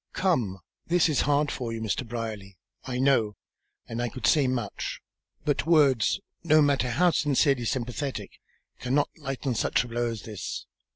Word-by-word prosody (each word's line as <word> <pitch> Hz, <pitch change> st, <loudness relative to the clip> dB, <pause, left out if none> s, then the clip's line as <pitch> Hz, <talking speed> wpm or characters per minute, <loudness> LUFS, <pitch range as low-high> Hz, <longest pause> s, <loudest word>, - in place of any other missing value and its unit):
Come. 125 Hz, -, +1 dB, 0.3 s
This 175 Hz, 0 st, +4 dB
is 145 Hz, -, +2 dB
hard 145 Hz, +1 st, +2 dB
for 120 Hz, -3 st, -4 dB
you, 115 Hz, -, -4 dB
Mr. 110 Hz, +2 st, -2 dB
Brierly, 110 Hz, -5 st, -5 dB, 0.3 s
I 125 Hz, -2 st, -3 dB
know, 125 Hz, -6 st, +2 dB, 0.5 s
and 115 Hz, +1 st, -3 dB
I 120 Hz, -, -1 dB
could 130 Hz, -, -5 dB
say 145 Hz, -5 st, +4 dB
much. 120 Hz, -5 st, -3 dB, 0.5 s
But 145 Hz, 0 st, 0 dB
words, 145 Hz, -, +4 dB, 0.2 s
no 155 Hz, -2 st, +5 dB
matter 140 Hz, -4 st, +3 dB
how 175 Hz, +9 st, +3 dB
sincerely 140 Hz, -4 st, +2 dB
sympathetic, 130 Hz, +3 st, -3 dB, 0.5 s
cannot 130 Hz, +4 st, +1 dB
lighten 135 Hz, -3 st, -3 dB
such 115 Hz, -, +1 dB
a -, -, -8 dB
blow 120 Hz, 0 st, -1 dB
as 115 Hz, -2 st, -6 dB
this. 105 Hz, -4 st, -6 dB
130 Hz, 160 wpm, -27 LUFS, 115-145 Hz, 0.5 s, no